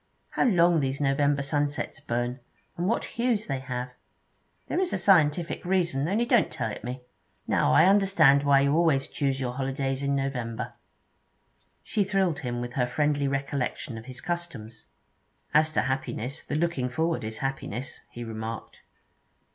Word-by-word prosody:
How - - +1
long 175 -7 +4
these 135 -1 -1
November 140 0 +2
sunsets 145 +2 -1
burn, 120 -2 -2 0.4
and 175 +2 -1
what 230 - +1
hues 235 -3 0
they 135 -2 -2
have! 125 -1 -5 0.7
There - - -1
is 375 -1 0
a - - +1
scientific 170 -3 +3
reason, 175 -6 +1
only 215 +6 +1
don't 240 -3 +3
tell 110 - -3
it 105 - -8
me. 125 +2 -5 0.4
Now - - +2
I 70 - +6
understand 190 -8 +5
why 140 -1 +4
you 140 +1 +2
always 160 -5 +3
used - - -17
to - - -17
choose 135 -2 0
your 125 -2 -2
holidays 135 0 -2
in 140 0 0
November.' 125 -3 -3 1.1
She 210 - 0
thrilled 190 -5 +1
him 120 -2 -3
with 120 0 -5
her 125 -2 +1
friendly 145 +2 +1
recollection 135 -1 -2
of 110 0 -8
his 130 0 -8
customs. 170 -11 -5 0.7
'As 155 +1 +4
to - - +3
happiness, 130 +1 -3
the - - -4
looking 155 -6 0
forward 160 +2 -1
is 110 0 -4
happiness,' 135 -2 -4
he 120 - -7
remarked. 115 0 -6
140 Hz, 165 wpm, -27 LUFS, 125-170 Hz, 1.1 s, I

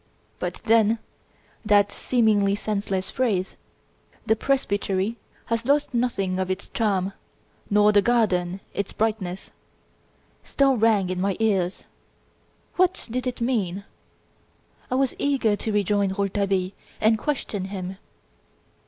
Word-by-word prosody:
But, - - -3
then, 225 0 +4 0.7
that 205 -2 +4
seemingly 210 -5 +2
senseless 200 -2 -2
phrase 205 -8 0 0.7
"The 220 - +3
presbytery 205 -4 0 0.3
has 230 0 -1
lost 285 +2 +1
nothing 200 -6 0
of 185 0 -1
its 185 +1 -4
charm, 200 -4 0 0.6
nor 210 0 +5
the 205 -1 +5
garden 195 -6 +1
its 200 - -3
brightness" 210 -4 -2 0.9
still 275 -1 +2
rang 215 -5 +2
in 180 0 -2
my 195 0 0
ears. 195 -4 0 0.9
What 370 0 +2
did 255 +2 -2
it 250 -1 -4
mean? 200 -6 -1 1.1
I 255 - 0
was 265 -1 +1
eager 265 -7 +2
to 220 - -3
rejoin 205 -1 +1
Rouletabille 195 -2 0 0.3
and 220 0 +3
question 225 -9 -2
him. 190 -1 -5
205 Hz, 120 wpm, -24 LUFS, 190-230 Hz, 1.1 s, nor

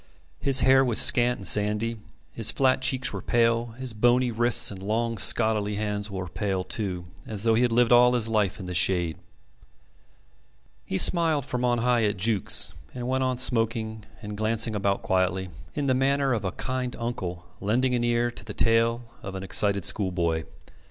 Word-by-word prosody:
His 135 -2 +4
hair 135 0 +4
was 120 -4 +4
scant 120 0 +5
and 95 - +1
sandy, 105 +4 +2 0.3
his 115 -2 0
flat 130 -1 +1
cheeks 130 0 +1
were - - -5
pale, 115 0 0
his 130 -3 -4
bony 120 +3 +1
wrists 120 0 +3
and 95 -2 -10
long 115 +2 -2
scholarly 105 0 +2
hands 105 0 -3
were 95 -2 -6
pale, 95 +1 -3
too, 90 -2 -3 0.2
as 105 -2 -3
though 115 -1 +3
he 115 - +2
had 125 -1 +1
lived 120 +1 +2
all 125 0 +5
his 120 -3 +1
life 105 -4 -1
in 95 - -8
the 90 - -6
shade. 85 -3 0 1.7
He 95 - -3
smiled 160 - +3
from 125 -2 -4
on 120 -1 +1
high 120 -1 +1
at 105 -1 -2
Jukes, 100 +1 +1 0.2
and 125 -1 -5
went 130 +1 -1
on 130 -1 -1
smoking 115 -3 -1 0.2
and 105 0 -7
glancing 110 +1 0
about 100 -1 -1
quietly, 95 0 -1 0.3
in 145 - -2
the 130 - +1
manner 135 +1 0
of 110 -3 -3
a 95 - -2
kind 130 -1 -4
uncle 90 -7 -6
lending 125 +6 0
an 120 -1 -1
ear 120 0 0
to 120 - -10
the 110 -2 -9
tale 115 +1 +1 0.2
of 95 -2 -8
an 95 - -6
excited 100 -1 +1
schoolboy. 85 -5 -1
115 Hz, 185 wpm, -25 LUFS, 100-125 Hz, 1.7 s, scant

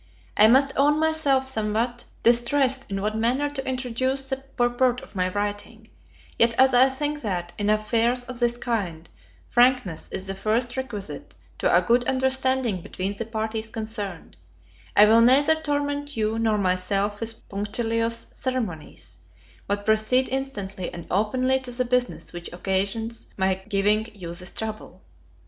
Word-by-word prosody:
I 215 - +7
must 270 +4 +4
own 295 +2 +4
myself 310 -4 +2
somewhat 235 0 -1 0.2
distressed 260 +3 +3
in 195 0 -3
what 215 +1 -1
manner 255 +6 0
to 270 -2 -5
introduce 260 +1 -1
the 265 - -1
purport 250 -2 0
of - - -14
my 185 -1 0
writing; 205 +3 -4 0.5
yet 230 0 +4
as 265 0 +5
I 255 +2 +6
think 295 +2 -3
that, 180 -5 -3
in 205 0 0
affairs 230 +3 +1
of 250 -1 -5
this 240 0 +1
kind, 190 -10 -3 0.4
frankness 240 -9 +2
is 190 - -5
the 195 - -3
first 220 +5 -1
requisite 225 -7 -6 0.2
to - - +2
a - - +2
good 240 +1 +3
understanding 260 -5 +1
between 190 +4 -4
the 225 +3 -5
parties 220 0 -3
concerned, 215 - -5 0.6
I 210 - +8
will 225 +2 +6
neither 275 +6 +6
torment 290 -2 -2
you 220 +1 0
nor 220 -2 +2
myself 195 +2 0
with 230 0 -5
punctilious 230 +3 -1
ceremonies, 230 - -5 0.5
but 205 0 -2
proceed 220 +4 +3
instantly 205 -9 -4
and 170 - -8
openly 255 +7 +1
to 260 -1 -6
the 250 +1 -1
business 250 -4 -1
which 175 0 -7
occasions 200 +5 -2
my 190 -1 +2 0.2
giving 210 +2 +2
you 170 -4 -7
this 180 +1 -7
trouble. 215 -3 -7
230 Hz, 150 wpm, -24 LUFS, 205-260 Hz, 0.6 s, I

